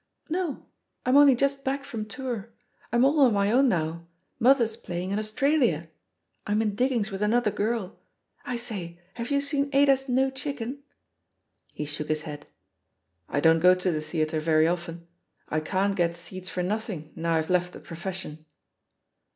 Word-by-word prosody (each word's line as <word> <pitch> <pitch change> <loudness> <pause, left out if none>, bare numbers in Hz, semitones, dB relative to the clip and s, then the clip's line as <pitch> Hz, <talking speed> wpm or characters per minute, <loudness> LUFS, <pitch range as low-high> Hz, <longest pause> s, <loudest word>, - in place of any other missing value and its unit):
"No; 340 -3 -2 0.4
I'm 255 +2 +3
only 285 -2 +8
just 275 +2 0
back 275 +1 -1
from 230 -6 -5
toiur. 230 0 -5 0.4
I'm 240 +2 +4
all 295 +3 +3
on 260 -5 +6
my 200 0 +2
own 260 +3 +5
now. 165 -2 -2 0.3
Mother's 235 -3 +4
playing 180 -3 -5
in 200 - 0
Australia. 215 - +1 0.6
I'm 210 +1 +1
in 210 -2 0
diggings 235 -2 0
with 195 +1 -5
another 215 +1 +2
girl. 210 -2 -2 0.4
I 250 - -3
sayl 195 -8 -6 0.2
have 235 0 -5
you 280 -1 +2
seen 280 0 0
Adas 275 -1 +3
No 265 +2 +2
Chicken 265 -2 -4
f^ - - -25 0.9
He 150 - -5
shook 150 +1 -5
his 155 0 -1
head. 145 -1 -8 0.8
"I 145 - 0
don't 165 +1 +5
go 180 +2 +6
to 185 0 0
the 155 -2 -2
theatre 155 0 -1
rery 155 0 +3
often. 170 -1 -7 0.4
I 155 - +1
can't 195 +5 0
get 170 -2 +1
seats 185 +2 -7
for 180 - -2
nothing 190 -6 -3
now 165 0 0
I've 160 +2 0
left 180 0 +1
the - - -9
profession." 170 -3 -7
205 Hz, 170 wpm, -27 LUFS, 170-260 Hz, 0.9 s, only